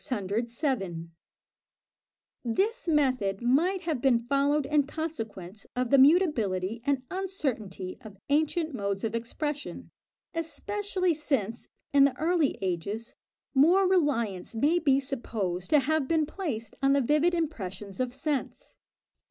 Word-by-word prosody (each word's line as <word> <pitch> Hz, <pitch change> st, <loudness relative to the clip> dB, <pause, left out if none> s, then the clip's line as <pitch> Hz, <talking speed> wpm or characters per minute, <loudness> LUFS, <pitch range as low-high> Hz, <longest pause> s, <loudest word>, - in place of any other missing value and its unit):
This 390 Hz, -, 0 dB
method 255 Hz, -, +2 dB
might 335 Hz, +10 st, +2 dB
have 320 Hz, -8 st, -2 dB
been 260 Hz, -3 st, +4 dB
followed 280 Hz, +4 st, +1 dB
in 290 Hz, 0 st, +2 dB
consequence 220 Hz, -, -6 dB
of 250 Hz, -1 st, -1 dB
the 275 Hz, -, +6 dB
mutability 230 Hz, -, +3 dB
and 275 Hz, -2 st, +1 dB
uncertainty 255 Hz, -, -3 dB
of 210 Hz, -3 st, -11 dB
ancient 315 Hz, +2 st, +1 dB
modes 200 Hz, -4 st, -2 dB
of 225 Hz, -1 st, -1 dB
expression, 290 Hz, +6 st, -4 dB, 0.4 s
especially 365 Hz, +3 st, -1 dB
since, 270 Hz, -8 st, -2 dB, 0.3 s
in 280 Hz, -1 st, +7 dB
the 260 Hz, -2 st, 0 dB
early 325 Hz, -1 st, +1 dB
ages, 195 Hz, +5 st, -3 dB, 0.4 s
more 345 Hz, +8 st, +5 dB
reliance 235 Hz, -, 0 dB
may 300 Hz, +9 st, +3 dB
be 275 Hz, -5 st, +3 dB
supposed 220 Hz, -10 st, -3 dB
to 300 Hz, -, +5 dB
have 305 Hz, 0 st, 0 dB
been 320 Hz, -2 st, +2 dB
placed 285 Hz, -, -5 dB
on 275 Hz, 0 st, +4 dB
the 280 Hz, -, +3 dB
vivid 300 Hz, +7 st, +3 dB
impressions 205 Hz, -, -4 dB
of 255 Hz, -1 st, 0 dB
sense. 275 Hz, +2 st, -3 dB
275 Hz, 120 wpm, -28 LUFS, 225-315 Hz, 0.4 s, in